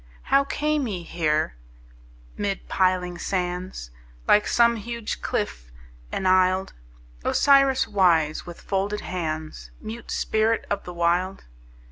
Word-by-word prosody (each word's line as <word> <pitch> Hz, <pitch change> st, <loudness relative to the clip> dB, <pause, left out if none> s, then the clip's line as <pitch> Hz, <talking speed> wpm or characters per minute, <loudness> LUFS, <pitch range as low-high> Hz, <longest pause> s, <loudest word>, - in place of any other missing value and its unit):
How 275 Hz, 0 st, +6 dB
came 300 Hz, -1 st, 0 dB
he 185 Hz, -5 st, -4 dB
here 155 Hz, -, 0 dB, 0.8 s
mid 200 Hz, -1 st, -3 dB
piling 180 Hz, -2 st, +1 dB
sands, 180 Hz, -, -3 dB, 0.4 s
Like 210 Hz, -, +5 dB
some 235 Hz, -1 st, +4 dB
huge 235 Hz, 0 st, -5 dB
cliff -, -, -3 dB, 0.4 s
enisled, 185 Hz, 0 st, +2 dB, 0.5 s
Osiris 275 Hz, -2 st, +4 dB
wise, 170 Hz, -7 st, +2 dB
with 175 Hz, -1 st, -10 dB
folded 200 Hz, +1 st, -1 dB
hands, 155 Hz, -3 st, -4 dB
Mute 225 Hz, +2 st, -8 dB
spirit 220 Hz, +1 st, +1 dB
of 205 Hz, -, -1 dB
the 180 Hz, -, -7 dB
Wild? 175 Hz, +3 st, 0 dB
185 Hz, 110 wpm, -25 LUFS, 175-220 Hz, 0.8 s, How